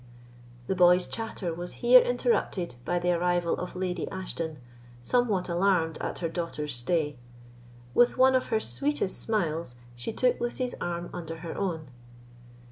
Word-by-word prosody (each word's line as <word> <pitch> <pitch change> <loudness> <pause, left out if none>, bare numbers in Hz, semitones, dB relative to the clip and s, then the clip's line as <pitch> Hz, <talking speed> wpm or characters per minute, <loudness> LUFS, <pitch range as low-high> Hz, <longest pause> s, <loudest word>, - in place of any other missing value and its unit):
The - - 0
boy's 180 0 +5
chatter 220 -6 -4
was 175 +2 -5
here 250 +1 +9
interrupted 240 -7 0
by 175 +7 0
the 175 0 +1
arrival 175 0 +1
of 180 - -5
Lady 180 -2 -2
Ashton, 170 -4 -4 0.4
somewhat 205 - +1
alarmed 175 -2 +1
at - - -3
her - - +3
daughter's 160 -3 -3
stay. 145 +3 0 0.7
With 245 0 +4
one 260 +1 +6
of 255 - +2
her 220 - +1
sweetest 285 -3 -1
smiles, 165 - 0 0.2
she 120 - -4
took 250 +2 +1
Lucy's 245 +1 -2
arm 175 0 -3
under 165 -2 -6
her 165 - -5
own. 165 -7 -3
180 Hz, 145 wpm, -28 LUFS, 165-220 Hz, 0.7 s, here